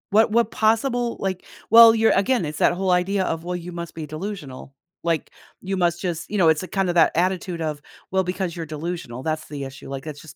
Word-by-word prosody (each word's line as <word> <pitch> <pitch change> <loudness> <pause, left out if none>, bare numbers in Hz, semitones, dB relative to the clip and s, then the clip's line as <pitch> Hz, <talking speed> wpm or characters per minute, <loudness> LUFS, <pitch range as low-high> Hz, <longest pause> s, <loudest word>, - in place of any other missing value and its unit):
What 215 +2 +4
what 230 0 +2
possible 235 +2 +1
like 185 -1 -3 0.2
well, 230 0 +9
you're 225 0 +4
again, 200 0 +2
it's 150 0 -5
that - - +4
whole 185 +1 0
idea 190 +2 +1
of, 165 -2 -3
"Well, 180 +1 -3
you 175 0 -6
must 170 -1 -7
be 160 -1 -5
delusional," 155 -5 -7 0.3
like, 165 -2 -1 0.3
"you 195 0 -3
must 175 -1 +1
just" 175 -2 -3
you 210 - -2
know, 170 -4 +5
it's 160 +2 +2
a - - -6
kinda 190 -2 0
that 170 -2 +4
attitude 180 0 -1
of, 155 -2 -3 0.3
"Well, 190 0 +2
because 180 -1 -2
you're 165 -2 -5
delusional, 155 -5 -6
that's 155 +1 -3
the 145 -2 -6
issue," 135 0 -9
like, 135 0 -5
that 155 -2 -7
just 145 -1 -13
175 Hz, 225 wpm, -23 LUFS, 155-195 Hz, 0.3 s, well